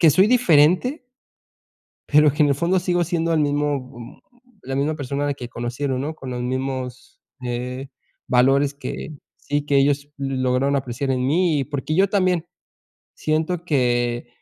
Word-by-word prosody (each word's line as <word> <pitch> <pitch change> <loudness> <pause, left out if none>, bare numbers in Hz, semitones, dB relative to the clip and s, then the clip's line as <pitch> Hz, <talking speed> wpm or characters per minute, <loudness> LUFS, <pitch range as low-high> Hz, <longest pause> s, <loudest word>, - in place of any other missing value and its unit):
que 165 - +7
soy 185 +7 +5
diferente 215 - +3 1.0
pero 150 0 +5
que 150 +2 +2
en 145 - +3
el 140 - +2
fondo 170 +6 +1
sigo 175 0 +1
siendo 165 0 -1
el 160 - +2
mismo, 145 -1 +1
mm, 120 -2 -12 0.4
la 135 +1 -4
misma 145 +3 0
persona 145 0 -2
que 125 -3 -8
conocieron, 125 +3 -3
¿no? 150 +3 -3
Con 135 -4 -8
los 125 0 -3
mismos 130 0 -4 0.2
eh, 125 +2 -4 0.4
valores 135 +3 +3
que 145 +2 -6 0.3
sí 145 0 -2
que 145 -1 +2
ellos 140 +1 +2
lograron 135 0 0
apreciar 135 +1 -3
en 130 -1 0
mí, 165 0 +2
y - - 0
porque 145 +2 -3
yo 195 +2 +3
también 185 -5 +1 0.7
siento 160 +3 -1
que 120 -5 0
145 Hz, 160 wpm, -22 LUFS, 130-160 Hz, 1.0 s, que